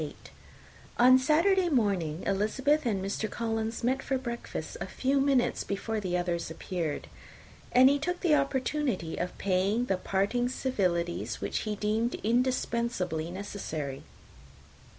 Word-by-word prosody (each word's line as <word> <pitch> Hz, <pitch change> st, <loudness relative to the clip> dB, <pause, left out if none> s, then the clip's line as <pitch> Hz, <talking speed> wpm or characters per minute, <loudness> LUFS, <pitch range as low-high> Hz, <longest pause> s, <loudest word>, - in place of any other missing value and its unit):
On 255 Hz, +2 st, +7 dB
Saturday 345 Hz, +7 st, +3 dB
morning 190 Hz, -, 0 dB
Elizabeth 255 Hz, +9 st, +1 dB
and 195 Hz, -4 st, -1 dB
Mr. 210 Hz, +2 st, -2 dB
Collins 225 Hz, 0 st, -2 dB
met 260 Hz, +3 st, +1 dB
for 270 Hz, -1 st, -1 dB
breakfast 240 Hz, -2 st, -5 dB
a -, -, -3 dB
few 275 Hz, +2 st, 0 dB
minutes 270 Hz, -3 st, +2 dB
before 215 Hz, +2 st, -2 dB
the 180 Hz, -3 st, -1 dB
others 175 Hz, -2 st, -2 dB
appeared; 165 Hz, -1 st, -3 dB, 0.7 s
and 255 Hz, +1 st, +7 dB
he 285 Hz, +1 st, +4 dB
took 355 Hz, +5 st, -2 dB
the 335 Hz, -4 st, +3 dB
opportunity 275 Hz, -, 0 dB
of 180 Hz, -, -3 dB
paying 195 Hz, +5 st, +1 dB
the 195 Hz, -5 st, 0 dB
parting 205 Hz, +7 st, 0 dB
civilities 180 Hz, -10 st, -1 dB
which -, -, -2 dB
he 210 Hz, -, -1 dB
deemed 215 Hz, +3 st, 0 dB
indispensably 235 Hz, -8 st, 0 dB
necessary. 170 Hz, -7 st, -5 dB
225 Hz, 130 wpm, -29 LUFS, 185-260 Hz, 0.7 s, On